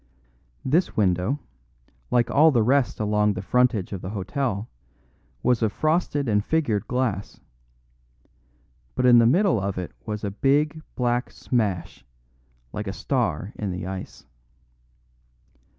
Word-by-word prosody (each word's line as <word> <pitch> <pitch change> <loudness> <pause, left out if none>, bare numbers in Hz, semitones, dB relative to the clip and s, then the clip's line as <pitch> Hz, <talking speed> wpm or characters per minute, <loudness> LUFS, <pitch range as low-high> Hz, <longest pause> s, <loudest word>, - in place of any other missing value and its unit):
This 165 +7 +1
window, 95 +5 +1 0.7
like 120 -1 +2
all 155 +3 +6
the 120 -7 +3
rest 130 +2 +2
along 105 -1 +2
the 95 - -5
frontage 120 -4 +1
of 95 - -5
the 95 - -5
hotel, 105 +2 -2 0.8
was 125 -1 +2
of 110 -2 +2
frosted 155 -1 0
and 105 -2 +2
figured 130 -10 0
glass; 120 -6 -2 1.6
but - - +1
in 120 -1 +8
the 115 - +5
middle 175 - +3
of 100 0 -3
it 90 -1 -4
was 105 0 -5
a 100 - -2
big, 145 +8 +1
black 120 0 0
smash, 105 -8 -2 0.7
like 105 0 -4
a 95 - -3
star 105 - -1
in 105 - -3
the 90 0 -4
ice. 95 -6 -7
115 Hz, 135 wpm, -24 LUFS, 100-135 Hz, 1.6 s, in